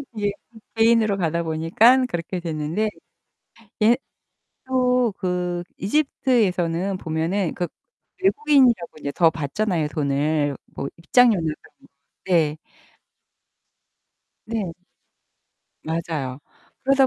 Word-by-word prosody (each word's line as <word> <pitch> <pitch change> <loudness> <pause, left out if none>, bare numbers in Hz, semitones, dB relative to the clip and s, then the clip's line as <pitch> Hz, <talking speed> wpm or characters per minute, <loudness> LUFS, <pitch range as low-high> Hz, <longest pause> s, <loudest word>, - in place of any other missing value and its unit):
이게 205 -1 0 0.4
개인으로 225 -2 +3
가다 170 -1 0
보니까 170 +11 +4
그렇게 175 0 -4
됐는데 165 +5 -2 0.9
예 230 +3 +6 0.7
또 250 -3 +2
그 180 -2 -2
이집트에서는 195 - +1
보면은 165 +2 -1
그 175 -1 -2 0.6
외국인이라고 275 - +3
인제 145 -2 -4
더 165 +3 +4
받잖아요. 165 +4 -1
뭐 - - -3
돈을 145 -1 0 0.2
뭐 140 - -3
입장료나 210 +4 +4 0.2
그런 - - -22 0.4
네. 160 -5 +2 1.9
네. 215 -6 -3 1.1
맞아요. 155 -5 -3 0.4
그러다 270 0 +4
180 Hz, 215 characters per minute, -23 LUFS, 160-225 Hz, 1.9 s, 예